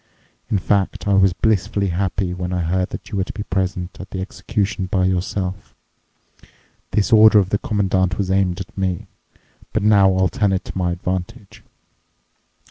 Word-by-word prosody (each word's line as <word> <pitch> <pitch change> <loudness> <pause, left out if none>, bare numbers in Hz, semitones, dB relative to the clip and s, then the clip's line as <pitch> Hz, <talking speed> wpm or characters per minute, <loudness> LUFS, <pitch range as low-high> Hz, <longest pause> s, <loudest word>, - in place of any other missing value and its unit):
In 105 - +2
fact, 100 +1 0
I 100 - +3
was 95 -1 +5
blissfully 100 -1 0
happy 90 +1 -1
when 90 0 -4
I 90 -1 -1
heard 90 +2 0
that - - -8
you 100 - -2
were - - +2
to - - -7
be 105 - -5
present 95 -2 -3
at 95 - -8
the 95 - -5
execution 100 0 -2
by 95 0 +1
yourself. 95 +1 -2 1.1
This 105 +3 +1
order 110 0 +8
of 95 -3 +3
the 105 - +1
Commandant 95 -3 0
was 95 -2 -1
aimed 95 -1 +1
at 95 - -8
me, 95 -3 -2 0.7
but 110 - 0
now 100 -2 +5
I'll 95 0 +3
turn 100 +3 0
it 95 - -2
to - - -8
my 90 -2 0
advantage. 90 +2 -5
95 Hz, 175 wpm, -20 LUFS, 90-100 Hz, 1.1 s, order